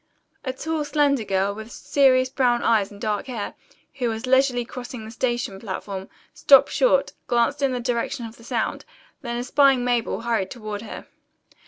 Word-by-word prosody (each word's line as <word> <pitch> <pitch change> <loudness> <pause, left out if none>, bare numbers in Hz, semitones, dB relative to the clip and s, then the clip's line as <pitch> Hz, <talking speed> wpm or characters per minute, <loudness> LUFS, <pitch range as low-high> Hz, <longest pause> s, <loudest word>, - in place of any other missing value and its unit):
A 260 - -2
tall 315 +4 -3
slender 285 -4 +2
girl, 195 0 0
with 220 +2 -9
serious 255 -2 +3
brown 245 -3 +1
eyes 215 -4 +3
and 205 - -13
dark 210 +3 -2
hair, 235 -5 -4 0.5
who 245 -2 +1
was 225 +2 -4
leisurely 260 -1 +3
crossing 245 -2 -8
the 220 - -9
station 240 -4 -2
platform, 195 -1 -6 0.2
stopped 275 -2 +6
short, - - +2
glanced 240 +4 +1
in 275 -1 +2
the 250 - -2
direction 240 +1 -2
of 225 +1 -10
the 230 - -16
sound, 235 -1 -2 0.4
then 240 -2 -4
espying 260 +1 +3
Mabel 240 -2 0
hurried 230 -5 -1
toward 215 -4 -6
her. 225 - -8
240 Hz, 170 wpm, -23 LUFS, 220-260 Hz, 0.5 s, stopped